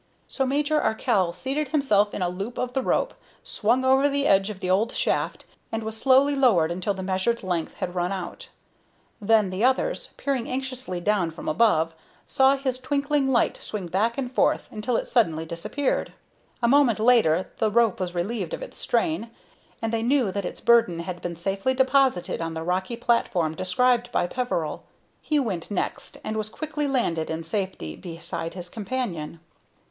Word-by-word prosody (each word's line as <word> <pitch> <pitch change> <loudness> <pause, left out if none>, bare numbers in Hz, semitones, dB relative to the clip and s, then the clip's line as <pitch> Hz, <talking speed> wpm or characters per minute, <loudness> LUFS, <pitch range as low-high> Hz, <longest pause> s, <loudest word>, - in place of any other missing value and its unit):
So 265 -2 -1
Major 295 +3 +1
Arkell 195 -5 +1
seated 275 - -2
himself 215 -9 +2
in 185 - -1
a - - +1
loop 195 +7 -5
of 250 0 -2
the 265 - +1
rope, - - 0 0.3
swung 260 - +1
over 265 +2 +4
the 280 0 0
edge 195 -4 +4
of 205 -3 -7
the 185 - -4
old 200 +6 +2
shaft, - - -1 0.3
and 225 0 -2
was 220 0 -4
slowly 270 +4 +4
lowered 205 -12 +4
until 185 +3 -1
the 190 - -5
measured 190 +5 0
length 175 -3 -2
had 180 - -4
run 180 0 -1
out. 190 -2 -6 0.7
Then 210 -2 +3
the 185 +4 -2
others, 260 +1 +1
peering 270 -4 -2
anxiously 255 -7 -3
down 200 -3 +1
from 165 - -9
above, 165 -3 +3 0.3
saw 270 +1 +4
his 265 -2 -2
twinkling 280 0 0
light 240 - +2
swing 210 -4 -5
back 220 +7 +1
and 255 -3 -3
forth - - +2
until 220 +3 -1
it - - -3
suddenly 165 -10 +1
disappeared. 170 - -2 0.5
A - - +5
moment 270 -3 +4
later 215 -7 +3
the 220 - +2
rope 225 -2 +2
was 180 -1 -3
relieved 220 - -2
of - - -8
its - - -10
strain, 315 -9 0 0.5
and 225 0 -1
they 225 - +1
knew 245 -3 +2
that 200 0 -3
its - - -5
burden 230 -8 +4
had 175 0 -6
been 175 -1 -4
safely 195 +9 -1
deposited 260 -10 +2
on 165 0 -3
the 160 - -4
rocky 185 +6 -1
platform 185 -9 +1
described 240 +8 +1
by - - +1
Peveril. 175 -7 -2 0.4
He 305 - 0
went 205 - -2
next, 205 - -3
and 215 0 -3
was 215 0 -2
quickly 300 +3 -3
landed 175 - 0
in 160 +1 -3
safety 165 - -3
beside 165 -1 -6
his 180 -1 -6
companion. 195 -7 -4
220 Hz, 180 wpm, -25 LUFS, 180-260 Hz, 0.7 s, A